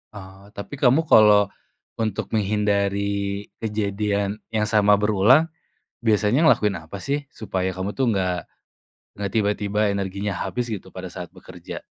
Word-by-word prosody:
Oh, 95 Hz, 0 st, -12 dB
tapi 130 Hz, +7 st, -7 dB
kamu 135 Hz, +5 st, +4 dB
kalo 105 Hz, -, +5 dB, 0.5 s
untuk 110 Hz, -3 st, -2 dB
menghindari 100 Hz, -1 st, 0 dB, 0.2 s
kejadian 105 Hz, -1 st, -1 dB
yang 110 Hz, -1 st, -1 dB
sama 105 Hz, -1 st, +4 dB
berulang 110 Hz, -, +4 dB, 0.5 s
biasanya 115 Hz, +6 st, +2 dB
ngelakuin 105 Hz, -, +3 dB
apa 80 Hz, +5 st, -9 dB
sih? 140 Hz, 0 st, -2 dB
Supaya 95 Hz, -7 st, -3 dB
kamu 95 Hz, +2 st, -3 dB
tuh 130 Hz, +3 st, -1 dB
nggak, 90 Hz, -2 st, 0 dB, 0.8 s
nggak 100 Hz, -2 st, -3 dB
tiba-tiba 105 Hz, 0 st, +1 dB
energinya 100 Hz, +1 st, -3 dB
habis 120 Hz, +4 st, -3 dB
gitu 105 Hz, -4 st, -7 dB
pada 95 Hz, -1 st, -7 dB
saat 90 Hz, -1 st, -7 dB
bekerja? 90 Hz, -1 st, -10 dB
105 Hz, 130 wpm, -23 LUFS, 100-110 Hz, 0.8 s, kalo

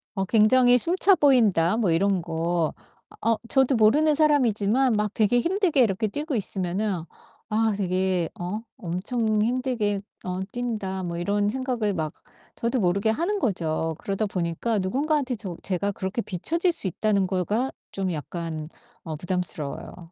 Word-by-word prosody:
어 195 Hz, -, -1 dB
'굉장히 245 Hz, +4 st, +5 dB
숨차 370 Hz, -, +5 dB
보인다.' 225 Hz, -, +3 dB
뭐 205 Hz, -7 st, +1 dB
이런 190 Hz, +2 st, +2 dB
거. 165 Hz, 0 st, -1 dB, 0.5 s
어 225 Hz, 0 st, +2 dB
저도 265 Hz, +1 st, +3 dB
모르는 290 Hz, +8 st, +4 dB
사람이지만 255 Hz, -5 st, +2 dB
막 210 Hz, 0 st, -1 dB
되게 225 Hz, +3 st, +2 dB
힘들게 345 Hz, -, +2 dB
이렇게 215 Hz, 0 st, 0 dB
뛰고 295 Hz, +5 st, -3 dB
있으면은 190 Hz, -2 st, -1 dB, 0.5 s
'아 220 Hz, 0 st, +1 dB
되게 185 Hz, -2 st, 0 dB
어 180 Hz, +5 st, -3 dB, 0.2 s
엄청 215 Hz, +3 st, -1 dB
힘들게 230 Hz, -4 st, 0 dB, 0.2 s
어 180 Hz, 0 st, -3 dB
뛴다.' 215 Hz, -6 st, -3 dB
뭐 170 Hz, -1 st, -4 dB
이런 205 Hz, +3 st, 0 dB
생각을 245 Hz, -4 st, -1 dB
막 155 Hz, -3 st, -3 dB, 0.4 s
저도 235 Hz, +2 st, -1 dB
모르게 195 Hz, +3 st, +1 dB
하는 350 Hz, -, 0 dB
거죠. 165 Hz, -, -1 dB
그러다 195 Hz, +2 st, -2 dB
보니까 195 Hz, +3 st, -1 dB
누군가한테 270 Hz, +6 st, 0 dB
저 195 Hz, -5 st, -6 dB
제가 200 Hz, +1 st, -1 dB
그렇게 190 Hz, +4 st, -3 dB
비춰질 330 Hz, -, 0 dB
수 325 Hz, -, -2 dB
있다는 200 Hz, +1 st, 0 dB
거가 205 Hz, +8 st, -1 dB, 0.2 s
좀 190 Hz, -2 st, -2 dB
약간 160 Hz, 0 st, -5 dB, 0.3 s
어 160 Hz, -3 st, -5 dB
부담스러워요. 175 Hz, -1 st, -4 dB
210 Hz, 305 characters per minute, -25 LUFS, 180-245 Hz, 0.5 s, 굉장히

